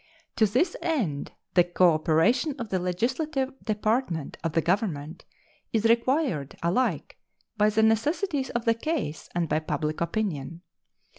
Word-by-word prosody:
To 220 - +5
this 260 - +1
end 230 - -1 0.2
the 175 - +6
cooperation 175 - +3
of 235 -4 -5
the 185 - 0
legislative 260 - -1
department 215 - -1
of 165 -2 -1
the 165 - +3
Government 170 -4 -2 0.5
is 220 -1 0
required 230 - +1
alike 185 +10 0 0.4
by 210 -1 +3
the 215 +1 +2
necessities 285 - +1
of 235 0 -3
the 230 - +4
case 230 - -3
and 175 -1 +1
by 155 - +1
public 155 0 -3
opinion. 170 -4 -2
210 Hz, 135 wpm, -27 LUFS, 165-255 Hz, 0.5 s, the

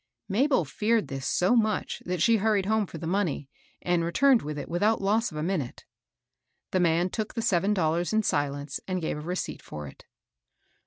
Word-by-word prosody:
Mabel 245 - +2
feared 215 +9 0
this 135 -1 -4
so 185 +7 +3
much 215 -3 0
that 180 -2 0
she 230 -1 +5
hurried 210 -2 +1
home 215 0 +1
for 165 - -8
the 165 - -6
money, 165 -6 -1 0.3
and 175 -1 +1
returned 255 +9 +4
with 150 0 -5
it 145 - -5
without 205 +6 +1
loss 215 +4 +1
of 155 - -7
a 150 - -2
minute. 165 -8 -3 0.9
The 185 - +2
man 175 +1 +2
took 215 -1 -4
the 230 - -1
seven 195 +1 +2
dollars 170 -1 +1
in 220 0 +2
silence, 145 -3 -1
and 185 -1 -1
gave 160 -2 -3
a - - -6
receipt 180 +4 -4
for 75 -1 -8
it. 70 - -13
180 Hz, 195 wpm, -27 LUFS, 160-215 Hz, 0.9 s, she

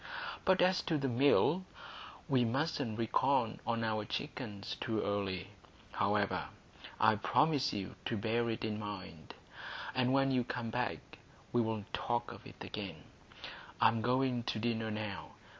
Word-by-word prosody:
But 190 -2 +5
as 185 +1 +4
to 160 - +3
this 135 -3 0
Mill, 145 +7 +4 0.6
we 130 -5 +4
mustn't 130 -2 0
reckon 115 0 +2
on 115 -1 +1
our 110 -1 0
chickens 105 -5 -4
too 110 -3 0
early. 100 -2 -1 0.4
However, - - +1 0.5
I 110 0 +6
promise 145 +5 +3
you 100 -2 -4
to 115 - 0
bear 115 +3 +1
it 115 0 -2
in 105 -1 -2
mind, 95 -6 -7 0.6
and 130 0 +2
when 135 0 +4
you 125 -2 +3
come 120 -1 -3
back - - -3 0.3
we'll 110 -3 +1
talk 120 0 -1
of - - -10
it - - -10
again. 95 -8 -6 0.8
I - - +7
am 115 0 -1
going 125 +1 +2
to - - -1
dinner 110 0 0
now. 105 -2 -4
115 Hz, 145 wpm, -34 LUFS, 105-130 Hz, 0.8 s, I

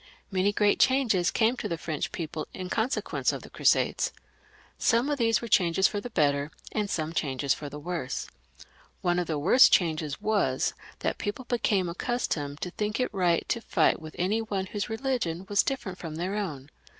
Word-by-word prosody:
Many 190 +1 +2
great 205 0 +2
changes 240 -10 +3
came 230 +2 +2
to - - -3
the 170 - -2
French 160 -2 -3
people 155 -2 -4
in 185 -1 -6
consequence 230 +4 0
of - - -6
the - - -13
Crusades. - - +2 0.7
Some 245 +5 +2
of 285 - -1
these 230 0 +2
were - - -3
changes 190 -2 +4
for 205 - -3
the 245 - -6
better, 145 -7 +1 0.2
and 210 -2 -1
some 160 -2 -2
changes 140 -3 0
for 145 - -7
the 145 - -8
worse. 160 -3 -3 0.8
One 175 0 +2
of 175 - -2
the 155 - -1
worst 185 - +6
changes 155 -4 +1
was 200 -12 +1 0.3
that - - -1
people 205 +5 -4
became 210 -6 +1
accustomed 170 - -2
to 180 - -3
think 210 +4 -2
it 250 - 0
right 175 -4 +1
to 235 - 0
fight 165 -6 +2
with 155 -1 -9
any 200 +6 +1
one 200 -4 -2
whose 205 +4 -4
religion 220 -8 -2
was 200 0 +4
different 200 -9 -3
from 160 -3 -6
their 180 +4 -2
own. 150 -9 -4
185 Hz, 185 wpm, -28 LUFS, 160-220 Hz, 0.8 s, worst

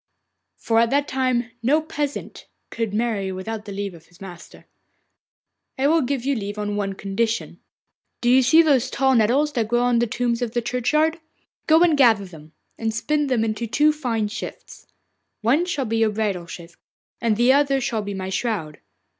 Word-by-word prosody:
For 225 -1 +1
at 230 0 +3
that 285 +2 +1
time 255 -2 -1
no 275 +7 +3
peasant 295 -2 -5 0.2
could 230 -3 -2
marry 210 -3 -1
without 210 +4 -6
the 205 - -7
leave 200 -1 -4
of 165 -2 -16
his 175 0 -23
master. 180 -3 -12 1.1
'I 270 +1 +2
will 325 +1 +3
give 265 -1 -2
you 280 - +1
leave 205 -4 -4
on 205 -1 -3
one 200 -1 -2
condition. 210 +4 -2 0.6
Do 240 - -2
you 255 +2 +6
see 315 +6 +6
those 265 -5 +2
tall 265 0 +2
nettles 255 +6 +3
that 230 -4 0
grow 240 +2 +1
on 245 -1 +2
the 240 - +1
tombs 235 +1 -1
in 245 - -1
the 240 +2 -2
churchyard? 305 +8 0 0.5
Go 320 +2 +6
and 335 -3 +4
gather 230 -8 +4
them, 160 -3 -14 0.3
and 225 -1 -1
spin 295 +6 -1
them 250 -4 +1
into 225 +1 -3
two 300 +7 +3
fine 235 -8 -2
shifts. 220 +3 -9 0.5
One 270 +10 +2
shall 290 -7 -2
be 225 0 -1
your 225 -1 +3
bridal 205 -5 -2
shift, 170 -1 -11 0.4
and 225 -3 +1
the 245 +3 +5
other 275 -1 +2
shall 230 -4 -2
be 200 -1 -5
my 190 0 -4
shroud. 190 -7 -3
235 Hz, 190 wpm, -22 LUFS, 205-270 Hz, 1.1 s, you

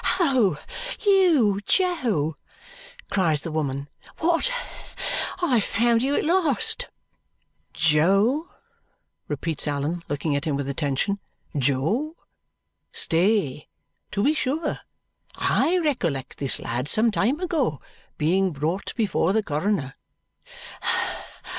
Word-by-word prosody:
"Oh, 250 - +3 0.5
you, 320 - +4
Jo!" 240 - +1 0.8
cries 165 -7 +3
the 165 - -5
woman. 140 -3 -2 0.3
"What? 340 +9 +1 0.9
I 270 -8 +3
have 215 - +2
found 230 +2 +2
you 275 +3 +1
at - - 0
last!" 330 -5 +2 0.8
"Jo," 195 - +3 0.8
repeats 150 +1 -2
Allan, 145 +4 -1
looking 145 +1 -1
at 140 - -1
him 150 -3 0
with 140 -1 -3
attention, 140 +8 -1 0.4
"Jo! 150 - 0 0.8
Stay. 165 -5 +1 0.4
To 200 -1 -1
be 295 - +4
sure! 300 +2 -1 0.6
I 360 +3 +2
recollect 205 - -1
this 140 -2 -1
lad 120 +3 -3
some 225 +1 +4
time 215 - +1
ago 315 - 0 0.4
being 185 +5 +2
brought 160 +7 -2
before 200 -5 +1
the 220 0 +2
coroner." 155 -4 -1
195 Hz, 105 wpm, -24 LUFS, -, 0.9 s, you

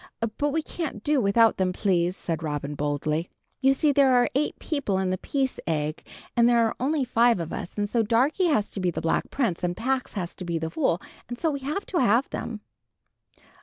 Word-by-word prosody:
"But 290 0 +2
we 315 +2 -1
can't 305 - -5
do 295 -3 +2
without 225 +2 +4
them, 185 -1 +1
please," 180 -2 +1
said 165 -2 -3
Robin, 150 -2 -3
boldly. 150 +3 -1 0.3
"You 270 0 +5
see 290 +2 +3
there 275 -2 +4
are 245 0 +3
eight 285 +3 0
people 280 - -1
in 190 -1 0
'The 185 - -2
Peace 270 -2 -1
Egg,' 155 -1 -2 0.3
and 235 0 +5
there 235 -1 +4
are 225 - -1
only 280 +1 +1
five 235 -3 +3
of 165 -1 -4
us; 175 - -6
and 205 0 0
so 230 +3 +1
Darkie 255 - +2
has 215 -10 +1
to - - -5
be 185 -1 +1
the 170 - -3
Black 165 0 0
Prince, 230 -12 -1
and 175 0 -1
Pax 260 +2 -1
has 180 -4 -4
to - - -9
be 170 -1 -2
the 160 0 -3
Fool, 180 - +1 0.3
and 240 - -5
so 320 +4 0
we 280 - -3
have 295 +9 -3
to 360 - -1
have 235 +3 +3
them." 215 -3 -5
225 Hz, 220 wpm, -26 LUFS, 175-270 Hz, 0.3 s, You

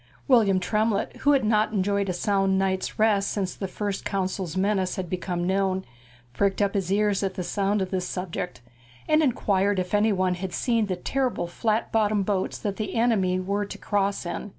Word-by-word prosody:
William 215 -8 +4
Tremlett, 210 +3 0
who 290 - +3
had 275 - +3
not 215 0 +2
enjoyed 200 0 0
a - - 0
sound 195 +1 +1
night's 190 -1 -1
rest 215 -2 +3
since 190 -3 -2
the 195 - -5
First 200 +1 -3
Consul's 190 -3 -2
menace 190 -1 +1
had 185 -3 -5
become 175 -1 -2
known, 190 0 0 0.5
pricked 195 +7 +1
up 200 -1 +1
his 190 -3 -1
ears 205 0 +2
at 195 -2 -2
sound 200 +1 0
of 185 - -6
this 185 -1 -1
subject, 180 -4 -4 0.5
and 310 0 +4
inquired 205 -7 +1
if 180 +1 -2
anybody 195 -4 +2
had 185 0 -5
seen 230 -4 +1
the 185 - -1
terrible 255 +3 -1
flat 215 +6 -1
bottomed 210 -2 +2
boats 195 -2 -1
that 200 -2 -4
the 215 -2 -4
enemy 205 -6 +2
were 200 +2 -1
to 200 - -7
cross 200 -2 -1
in. 175 +4 -4
195 Hz, 185 wpm, -25 LUFS, 185-210 Hz, 0.5 s, William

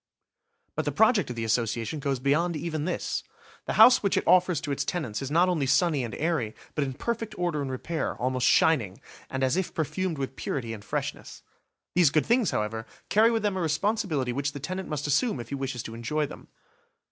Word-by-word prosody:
But - - -2
the - - 0
project 220 - +3
of 125 - -4
the 115 - -3
Association 115 +5 -1
goes 140 -1 -1
beyond 155 +6 +1
even 155 -1 -3
this. 180 - -2 0.4
The - - -1
house 250 - +8
which 200 - +1
it - - +1
offers 180 -3 +4
to 145 - -4
its 140 0 -1
tenants 140 - -3
is 135 - -4
not 170 +5 +4
only 160 -7 0
sunny 155 -2 +3
and 120 - -5
airy, 155 -9 -1 0.2
but 150 - 0
in 135 -1 -3
perfect 225 - -3
order 175 -4 -1
and 140 - -3
repair, 155 +5 -3
almost 130 0 0
shining, 115 - +3 0.3
and 130 0 -2
as 130 +3 +2
if 190 - -2
perfumed 170 +2 -1
with 135 -1 -4
purity 120 -5 -3
and 105 -2 -9
freshness. - - -5 0.5
These 175 -3 +5
good 155 +2 +2
things, 235 -2 +3
however, 110 +1 -2 0.2
carry 220 +2 +5
with 225 -2 0
them 205 -2 +1
a - - -1
responsibility 160 - 0
which 140 +2 -2
the 145 - -6
tenant 185 +6 -5
must 150 -2 -3
assume 150 - +1
if 120 - -7
he - - -3
wishes 130 -3 -4
to 110 - -7
enjoy 150 +7 -1
them. - - -11
150 Hz, 210 wpm, -27 LUFS, 130-180 Hz, 0.5 s, house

